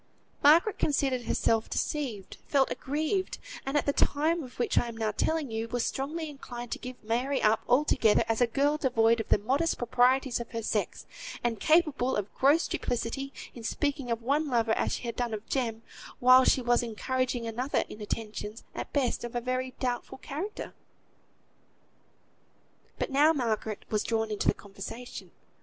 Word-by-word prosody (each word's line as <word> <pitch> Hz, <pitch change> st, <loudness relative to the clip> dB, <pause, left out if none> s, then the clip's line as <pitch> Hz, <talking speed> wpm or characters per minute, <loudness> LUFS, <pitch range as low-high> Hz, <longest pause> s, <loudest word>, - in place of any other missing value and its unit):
Margaret 330 Hz, +8 st, +5 dB
considered 270 Hz, -4 st, +1 dB
herself 225 Hz, 0 st, +1 dB
deceived; 240 Hz, -11 st, -3 dB
felt 275 Hz, -2 st, +2 dB
aggrieved; 310 Hz, +7 st, -1 dB, 0.3 s
and, 275 Hz, +2 st, +1 dB
at -, -, +1 dB
the 285 Hz, -, +2 dB
time 315 Hz, +5 st, +2 dB
of 255 Hz, -4 st, -10 dB
which 245 Hz, -, 0 dB
I 240 Hz, -, -2 dB
am 230 Hz, -1 st, -7 dB
now 220 Hz, -1 st, 0 dB
telling 310 Hz, +3 st, -1 dB
you, 225 Hz, +1 st, -2 dB
was 240 Hz, 0 st, -1 dB
strongly 310 Hz, +4 st, -3 dB
inclined 245 Hz, -5 st, -8 dB
to -, -, -3 dB
give 250 Hz, -1 st, -9 dB
Mary 245 Hz, +5 st, 0 dB
up 215 Hz, +1 st, +3 dB
altogether, 245 Hz, -4 st, +4 dB
as 225 Hz, +1 st, 0 dB
a 245 Hz, -, +5 dB
girl 285 Hz, +5 st, +1 dB
devoid 235 Hz, -5 st, +3 dB
of 225 Hz, -, -4 dB
the -, -, +5 dB
modest 270 Hz, +11 st, 0 dB
proprieties 250 Hz, +1 st, +2 dB
of 235 Hz, -, -6 dB
her 230 Hz, -1 st, -3 dB
sex, -, -, -2 dB, 0.4 s
and 235 Hz, -3 st, 0 dB
capable 305 Hz, -, +3 dB
of 205 Hz, -1 st, -3 dB
gross 290 Hz, +5 st, +3 dB
duplicity, 250 Hz, +3 st, -2 dB, 0.2 s
in 235 Hz, -, -10 dB
speaking 280 Hz, +1 st, -1 dB
of 230 Hz, 0 st, -2 dB
one 290 Hz, +5 st, +1 dB
lover 230 Hz, -4 st, +1 dB
as -, -, +1 dB
she -, -, -4 dB
had 235 Hz, -2 st, -4 dB
done 240 Hz, -3 st, -1 dB
of 215 Hz, +1 st, -9 dB
Jem, 230 Hz, -4 st, -2 dB, 0.3 s
while 255 Hz, +1 st, +7 dB
she 255 Hz, -, +3 dB
was 240 Hz, +1 st, +3 dB
encouraging 245 Hz, +1 st, -2 dB
another 245 Hz, +5 st, -1 dB
in 210 Hz, -, -10 dB
attentions, 210 Hz, +1 st, -5 dB
at -, -, -6 dB
best 265 Hz, -5 st, 0 dB
of 240 Hz, 0 st, -6 dB
a -, -, +2 dB
very 255 Hz, +1 st, -2 dB
doubtful 245 Hz, -1 st, -2 dB
character. 330 Hz, +11 st, -6 dB, 2.2 s
But -, -, -2 dB
now 295 Hz, +4 st, +5 dB
Margaret 220 Hz, -6 st, -2 dB
was 215 Hz, -1 st, +2 dB
drawn 225 Hz, -1 st, -1 dB
into 210 Hz, -, -2 dB
the -, -, +4 dB
conversation. 210 Hz, +5 st, -8 dB
245 Hz, 175 wpm, -29 LUFS, 225-280 Hz, 2.2 s, while